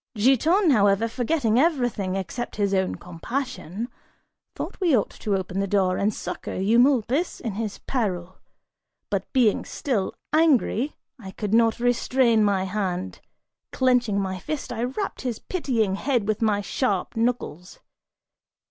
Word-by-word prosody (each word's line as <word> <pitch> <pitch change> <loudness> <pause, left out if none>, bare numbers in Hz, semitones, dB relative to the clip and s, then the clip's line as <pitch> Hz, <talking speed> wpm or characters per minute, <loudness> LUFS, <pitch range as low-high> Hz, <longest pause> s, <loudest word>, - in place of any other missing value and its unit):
Giton, 300 - +4
however, 205 -2 +3
forgetting 245 -1 +1
everything 245 - +1
except 195 +6 -4
his 200 -1 0
own 190 -1 +1
compassion, 225 - -5 0.7
thought - - -6
we 330 -8 +4
ought 205 - -1
to 205 -2 -2
open 190 0 -3
the 200 - 0
door 185 -2 +2
and 205 +2 +2
succor 180 -3 -6
Eumolpus, 245 - +2
in 230 - -3
his 215 0 -4
peril; 185 -8 -3 0.7
but - - -2
being 245 -6 +3
still 230 -9 -2 0.2
angry, 295 -4 +3 0.2
I 195 -5 -9
could 205 +2 -4
not 225 0 +4
restrain 245 -1 +3
my 200 -2 +2
hand; 185 -2 -3 0.5
clenching 245 -6 +2
my 190 -1 -2
fist, 270 +1 -4
I 235 +1 -1
rapped 330 +11 -4
his 245 -4 -2
pitying 235 - -1
head 245 -4 0
with 215 0 -1
my 210 -2 +2
sharp 205 -2 -1
knuckles. 225 -7 -2
225 Hz, 140 wpm, -24 LUFS, 195-255 Hz, 0.7 s, Giton